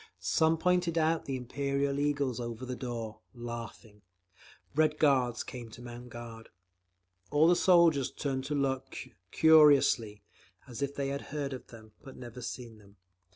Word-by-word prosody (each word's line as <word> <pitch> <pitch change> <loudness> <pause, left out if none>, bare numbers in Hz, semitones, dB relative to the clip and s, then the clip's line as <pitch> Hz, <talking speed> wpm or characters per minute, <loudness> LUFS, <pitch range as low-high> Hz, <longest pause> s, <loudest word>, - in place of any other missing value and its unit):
Some 160 +1 +2
pointed 175 0 +1
out 160 0 +1
the 135 - -3
Imperial 140 +2 -2
eagles 145 -4 0
over 120 +1 -5
the 125 0 -4
door, 115 -4 -6 0.2
laughing…. 115 -3 -8 0.7
Red 155 0 +2
Guards 130 -6 +2
came 120 -2 -8
to 120 - -12
mount 120 0 -9
guard. 115 -1 -10 0.8
All 150 +2 +4
the 175 - +5
soldiers 170 -7 +4
turned 135 -2 -3
to 150 - -2
look, 135 -1 -2 0.3
curiously, 140 -9 +5 0.4
as 125 +1 -8
if 140 0 -2
they 140 -1 -2
had 140 0 -3
heard 140 -2 -3
of 130 - -8
them 110 -2 -14
but 135 - -12
never 125 0 -9
seen 115 -2 -7
them. 100 -1 -20
130 Hz, 155 wpm, -30 LUFS, 120-145 Hz, 0.8 s, the